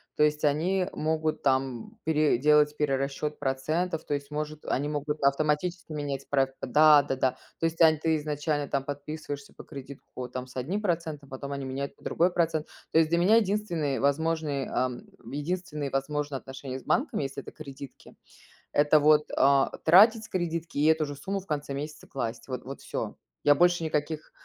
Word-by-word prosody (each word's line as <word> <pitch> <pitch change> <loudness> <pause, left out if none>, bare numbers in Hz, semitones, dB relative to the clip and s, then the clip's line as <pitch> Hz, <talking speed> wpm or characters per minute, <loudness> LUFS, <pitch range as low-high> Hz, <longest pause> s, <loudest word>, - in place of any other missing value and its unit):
то 150 - +3
есть 150 0 +2
они 180 +6 +1
могут 155 0 -1
там 130 -3 0
пере 155 -4 +3
делать 150 +2 +4
перерасчёт 140 +1 -1
процентов, 155 +6 -1
то 145 - -2
есть 140 0 -4
может, 150 0 -4
они 145 +3 0
могут 150 0 -3
автоматически 155 +5 0
менять 145 -3 -4
проц 135 -1 +2
Да-да-да. 140 -2 +5 0.3
То 165 - 0
есть 165 +1 -1
онь 160 -1 +7
ты 160 0 +2
изначально 150 -1 -2
там 135 -1 -1
подписываешься 145 0 -6
по - - -12
кредитку 140 -2 -10
по 125 -1 -5
там, 130 0 -5
с 125 - -16
одним 170 +12 -2
процентом, 160 -6 -2
потом 140 +1 -7
они 140 -1 -4
меняют 135 +1 -4
под - - -21
другой 175 +2 +2
процент. 165 -3 0 0.3
То 160 - +6
есть 160 -1 +3
для 170 - +2
меня 190 +6 +5
единственные 190 -10 0
возможные, 150 -1 0
эм 125 -1 -2 0.3
единственные 150 -1 -3
возможные 145 +1 -2
отношения 130 0 -7
с - - -17
банком, 265 -4 +1
если 135 -1 -4
это - - -10
кредитки, 140 -3 -11 0.6
это 150 +1 +4
вот, 150 0 +4
э, 135 0 +5 0.2
тратить 215 +7 +7
с - - -11
кредитки, 170 -3 -3
и 145 - +3
эту 160 -1 +4
же 145 0 -6
сумму 195 +4 -3
в 190 - -18
конце 145 -2 -3
месяца 150 +2 -6
класть. 115 -3 -4
Вот 130 -2 -5
вот 135 +1 -8
всё. - - -5 0.3
Я 145 - +7
больше 175 +2 +3
никаких 155 0 -2
150 Hz, 180 wpm, -28 LUFS, 140-160 Hz, 0.6 s, онь